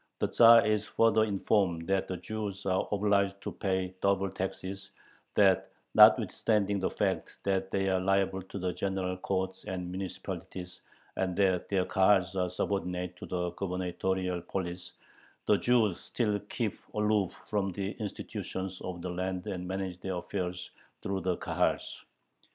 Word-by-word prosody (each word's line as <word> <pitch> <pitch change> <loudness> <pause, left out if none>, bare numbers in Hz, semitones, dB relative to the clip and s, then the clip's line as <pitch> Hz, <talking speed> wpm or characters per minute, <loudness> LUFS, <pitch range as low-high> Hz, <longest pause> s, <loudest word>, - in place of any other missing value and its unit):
The - - 0
Tzar 115 0 +8
is 105 -1 +1
further 110 -1 +4
informed 95 -4 +1
that 95 +1 +1
the 95 - -3
Jews 100 +1 -5
are 95 -1 +1
obliged 100 -1 +2
to 105 - -4
pay 95 0 -1
double 100 -1 +2
taxes, 95 +1 -5 0.5
that, 95 -2 +4 0.2
notwithstanding 100 -2 +5
the 95 - 0
fact - - -2
that 95 -1 0
they 95 0 0
are 95 -1 +2
liable 95 0 +1
to 95 +2 -8
the 90 -1 -1
general 95 -1 -2
courts 95 0 -2
and 90 -3 -4
municipalities, 90 -1 -6 0.4
and 95 -1 0
that 95 -2 +2
their 95 -2 +2
Kahals 95 -1 +3
are 90 -1 0
subordinate 90 -1 -2
to - - -8
the 90 -1 -2
gubernatorial 90 -1 -2
police, 90 0 -5 0.5
the 105 - +4
Jews 115 -7 +2
still 105 -4 -1
keep 115 -4 -2 0.2
aloof 105 -3 +2 0.2
from 100 -2 0
the 95 +2 -3
institutions 95 -2 -5
of 90 -2 -6
the 90 - -3
land 90 0 -3
and 90 -1 -4
manage 95 -1 -3
their 95 0 -3
affairs 90 0 -4 0.3
through 95 -1 -2
the 90 0 0
Kahals. - - -1
95 Hz, 150 wpm, -30 LUFS, 90-100 Hz, 0.5 s, Tzar